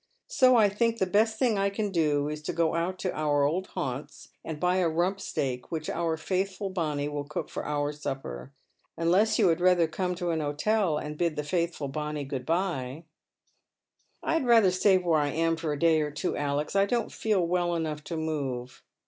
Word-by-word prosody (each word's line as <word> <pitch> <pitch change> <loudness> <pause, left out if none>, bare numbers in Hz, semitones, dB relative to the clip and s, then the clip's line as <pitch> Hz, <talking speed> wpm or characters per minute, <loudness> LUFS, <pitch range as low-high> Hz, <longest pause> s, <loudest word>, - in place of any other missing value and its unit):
So 255 -2 +4
I 220 -3 +6
think 230 +3 0
the 190 - +1
best 220 +4 +2
thing 230 -5 +2
I 200 0 +2
can 205 0 -2
do 150 -4 +1
is 150 0 -4
to 150 - -4
go 165 -1 +1
out 170 +3 -1
to 185 - -1
our 145 -2 +1
old 170 +7 0
haunts 135 +3 -5
and 155 -2 -6
buy 180 +2 +2
a 180 -3 +2
rump 175 +5 0
steak, 125 -8 -3
which 155 -2 -3
our 165 -1 -1
faithful 190 +3 -2
Bonny 150 -6 -1
will 145 -1 -3
cook 150 +1 -5
for - - -4
our 145 0 -1
Bupper. 135 - -5 0.5
Unless 190 +6 +3
you 200 -6 +4
had 165 +1 +1
rather 180 -2 +4
come 180 +3 -2
to 175 -1 -2
an 160 - 0
hotel 155 +4 +1
and 150 0 -6
bid 170 -3 +1
the 150 - -2
faithful 170 -2 -1
Bonny 150 +1 -3
good 135 -2 -5
bye." 165 -5 -1 0.6
*' - - -42
I - - 0
had 325 - +1
ratlier 225 -6 +5
stay 190 0 +4
where 170 -4 +2
I 145 - +1
am 165 +2 +1
for 165 -2 -3
a 145 - -2
day 160 0 +3
or 150 - -1
two, 150 0 -3
Alex; 145 +3 -2
I 200 0 +4
don't 235 0 -1
feel 205 -5 +1
well 175 0 0
enough 155 -2 -3
to 165 - -4
move." 135 -6 -3
165 Hz, 210 wpm, -28 LUFS, 150-190 Hz, 0.6 s, I